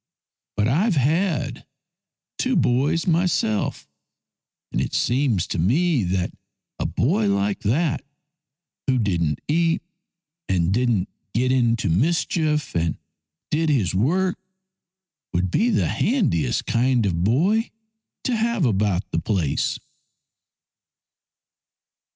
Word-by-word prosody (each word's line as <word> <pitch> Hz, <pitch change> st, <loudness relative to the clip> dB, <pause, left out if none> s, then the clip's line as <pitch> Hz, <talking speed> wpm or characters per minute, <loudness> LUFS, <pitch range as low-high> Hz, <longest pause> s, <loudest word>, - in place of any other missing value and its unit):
" -, -, -65 dB
But 105 Hz, 0 st, +2 dB
I've 175 Hz, -, +2 dB
had 145 Hz, -2 st, 0 dB, 0.7 s
two -, -, +1 dB
boys 140 Hz, +7 st, +2 dB
myself, 165 Hz, -, 0 dB, 0.8 s
and -, -, -1 dB
it -, -, -3 dB
seems 120 Hz, -, +1 dB
to -, -, -3 dB
me 135 Hz, -, +2 dB
that 90 Hz, 0 st, -1 dB, 0.5 s
a -, -, 0 dB
boy 110 Hz, -1 st, +1 dB
like 100 Hz, 0 st, 0 dB
that, 135 Hz, +8 st, 0 dB, 0.8 s
who 130 Hz, -1 st, +2 dB
didn't 85 Hz, -, 0 dB
eat 165 Hz, +2 st, +1 dB, 0.7 s
and 90 Hz, -1 st, +1 dB
didn't 115 Hz, -5 st, +1 dB, 0.3 s
get 125 Hz, +2 st, +2 dB
into 120 Hz, -4 st, +2 dB
mischief, 150 Hz, -, +1 dB
and 85 Hz, -1 st, 0 dB, 0.5 s
did 160 Hz, +1 st, +1 dB
his 115 Hz, -, +1 dB
work, 180 Hz, -, +1 dB, 1.0 s
would 90 Hz, +1 st, 0 dB
be 230 Hz, -, +2 dB
the 210 Hz, -, +1 dB
handiest 190 Hz, -, 0 dB
kind 120 Hz, -1 st, +2 dB
of 85 Hz, -3 st, 0 dB
boy 185 Hz, -, +2 dB, 0.5 s
to 250 Hz, -, 0 dB
have 225 Hz, -5 st, +1 dB
about 100 Hz, -4 st, +1 dB
the 80 Hz, -, 0 dB
place." 90 Hz, -10 st, 0 dB
125 Hz, 110 wpm, -23 LUFS, 100-165 Hz, 1.0 s, But